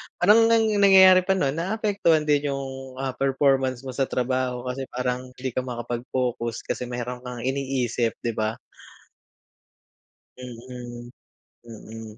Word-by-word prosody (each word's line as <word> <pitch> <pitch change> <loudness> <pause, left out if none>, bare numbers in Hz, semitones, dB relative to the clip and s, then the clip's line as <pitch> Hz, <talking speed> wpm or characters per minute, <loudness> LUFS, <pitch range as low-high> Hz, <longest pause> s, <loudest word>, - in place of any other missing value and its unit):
Parang 215 +5 +5
ang 230 -1 +4 0.2
nangyayari 190 -2 +8
pa 190 - +3
no'n 140 -7 +1
naapektuhan 185 -2 +1
din 145 -1 +1
yung, 135 -1 -7
ah, 135 0 -3
performance 135 -1 +1
mo 130 - -6
sa 135 +1 -1
trabaho 125 0 -1
kasi 135 0 -6
parang 125 0 -2 0.2
hindi 130 0 -4
ka 130 - -2
makapag-focus 120 -1 -3
kasi 125 - -4
mayro'n 125 0 -5
kang 125 -2 -7
iniisip, 130 -4 -1
'di 120 - 0
ba? 110 +1 -1 1.8
Mm. 120 -1 -9 0.5
Mm. 110 -1 -10
130 Hz, 130 wpm, -24 LUFS, 120-140 Hz, 1.8 s, nangyayari